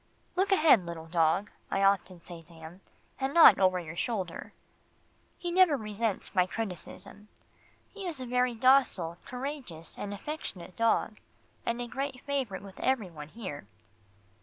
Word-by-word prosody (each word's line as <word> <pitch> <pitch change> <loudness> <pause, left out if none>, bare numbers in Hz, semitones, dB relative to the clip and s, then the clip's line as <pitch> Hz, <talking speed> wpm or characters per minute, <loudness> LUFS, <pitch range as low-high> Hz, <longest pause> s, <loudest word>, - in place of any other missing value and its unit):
"Look 380 +2 +1
ahead, 310 - +6
little 165 -1 -6
dog," 165 +4 +1 0.2
I 195 - 0
often 185 -3 +1
say 175 -2 -9
to 170 +1 -16
him, 160 +3 -11 0.4
"and 270 +2 -2
not 335 - +9
over 185 -1 +3
your 170 -1 -8
shoulder." 190 -3 -3 0.9
He 350 -1 -4
never 350 -5 +5
resents 215 -2 -3
my 180 -2 +3
criticism. 205 +1 -7 0.7
He 400 -3 -6
is 320 -6 -3
a 255 - -5
very 250 0 +1
docile, 225 -9 +3
courageous 250 - -6
and 205 - -4
affectionate 200 - -6
dog, 225 -1 +1 0.5
and 235 +1 0
a 245 - -3
great 265 0 -4
favourite 265 -10 -3
with 195 -1 -12
every 235 -8 0
one 150 -2 -9
here. 155 - -8
210 Hz, 150 wpm, -30 LUFS, 175-265 Hz, 0.9 s, not